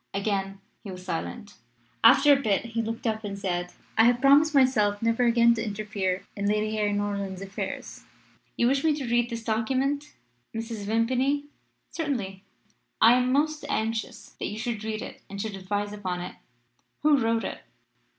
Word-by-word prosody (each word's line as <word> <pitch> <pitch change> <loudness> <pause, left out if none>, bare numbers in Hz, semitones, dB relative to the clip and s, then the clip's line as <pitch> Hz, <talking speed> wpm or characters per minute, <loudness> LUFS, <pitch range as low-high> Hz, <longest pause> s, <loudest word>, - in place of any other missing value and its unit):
"Again 195 -1 -1 0.2
he 205 - -8
was 185 -1 -8
silent. 205 +5 -5 0.5
"After 270 +5 +8
a 275 - +2
bit 210 -3 +1
he 230 0 -2
looked 225 +3 -5
up 220 -1 -1
and 200 -1 -5
said, 180 -2 -2 0.3
'I - - +8
had 240 0 +4
promised 285 +3 +5
myself 215 -7 +3
never 230 +2 +1
again 235 0 +5
to 225 -1 -2
interfere 205 -3 -2
in 200 0 -2
Lady 215 +1 0
Harry 210 -1 +1
Norland's 200 -2 -2
affairs. 195 +1 -6 0.5
You 235 - +3
wish 270 +3 +2
me 315 -2 +3
to 285 -3 -4
read 240 0 +2
this 230 -1 -5
document, 265 +7 -1 0.4
Mrs. 225 -2 -5
Vimpany?" 255 +6 +1 0.5
"'Certainly; 220 - -3 0.6
I 230 +2 +7
am 250 0 +2
most 300 +2 +1
anxious 225 0 -2
that - - -2
you 210 - -5
should 220 -1 -3
read 215 -1 -3
it - - -9
and 200 - -7
should 215 0 -3
advise 205 +2 -3
upon 185 -4 -3
it.' 180 - -6 0.7
"'Who 295 -2 +5
wrote 230 -1 +1
it?' - - -5
225 Hz, 170 wpm, -27 LUFS, 205-250 Hz, 0.7 s, After